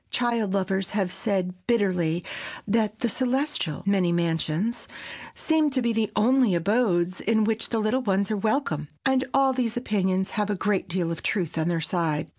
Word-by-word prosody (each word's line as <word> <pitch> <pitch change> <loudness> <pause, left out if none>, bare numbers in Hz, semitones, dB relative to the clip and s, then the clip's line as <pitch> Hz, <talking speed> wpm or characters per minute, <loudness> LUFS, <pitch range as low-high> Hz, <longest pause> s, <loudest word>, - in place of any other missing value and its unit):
Child 235 -5 0
lovers 190 -1 -1
have 190 -3 0
said 185 -4 -1
bitterly 180 -7 +1 0.4
that 220 0 0
the 240 - +2
celestial 255 - -1
"many 195 -3 +2
mansions" 170 +5 -1 0.5
seem 315 -2 +2
to 265 -2 -1
be 235 -1 +1
the 220 -1 0
only 240 -2 +3
abodes 185 -2 +1
in 220 0 +2
which 225 +1 0
the 230 - -1
little 220 +4 +1
ones 200 -2 0
are 215 - 0
welcome,—and 215 - -1
all 270 -1 +3
these 245 -3 -1
opinions 190 -5 0
have 210 -2 -1
a 205 - 0
great 195 -1 -1
deal 175 -1 0
of 165 - -5
truth 180 -7 -1
on 160 0 0
their 170 -1 0
side. 160 -2 -1
205 Hz, 170 wpm, -25 LUFS, 175-235 Hz, 0.5 s, only